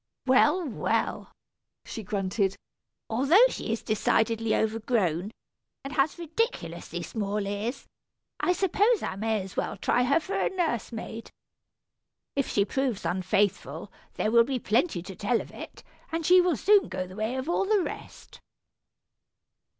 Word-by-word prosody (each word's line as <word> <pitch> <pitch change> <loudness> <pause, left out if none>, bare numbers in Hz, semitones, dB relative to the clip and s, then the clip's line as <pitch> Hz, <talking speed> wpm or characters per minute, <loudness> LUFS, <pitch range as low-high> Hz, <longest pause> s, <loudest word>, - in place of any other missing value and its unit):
"Well, 295 +6 +4
well," 250 - -1 0.5
she 225 - -6
grunted, 195 0 -1 0.5
"although 280 - +5
she 230 - -4
is 225 - -2
decidedly 225 +1 +1
overgrown, 215 -5 0 0.5
and 275 +2 -6
has 275 +5 +1
ridiculously 345 +9 -3
small 210 -2 -2
ears, 210 +6 -3 0.5
I 360 - +2
suppose 400 +5 +2
I - - -3
may 215 0 -1
as 190 - -10
well - - -2
try 245 - +1
her 280 +6 +3
for 375 - -6
a - - +1
nurse 330 - -1
maid. 225 0 -7 1.1
If 275 -1 0
she 200 - +2
proves 265 -3 -2
unfaithful, 190 +2 0 0.2
there 215 - 0
will 235 0 +7
be 260 +2 -2
plenty 225 - 0
to 190 +1 -9
tell 220 +5 +1
of - - -8
it, - - -10 0.3
and 330 0 -2
she 365 +2 +7
will 355 -6 +1
soon 405 - +4
go 185 0 -3
the 185 +1 -11
way 220 +4 -2
of 260 +2 -3
all 350 +3 +1
the 410 -2 +2
rest." - - -9
235 Hz, 150 wpm, -27 LUFS, 210-320 Hz, 1.1 s, will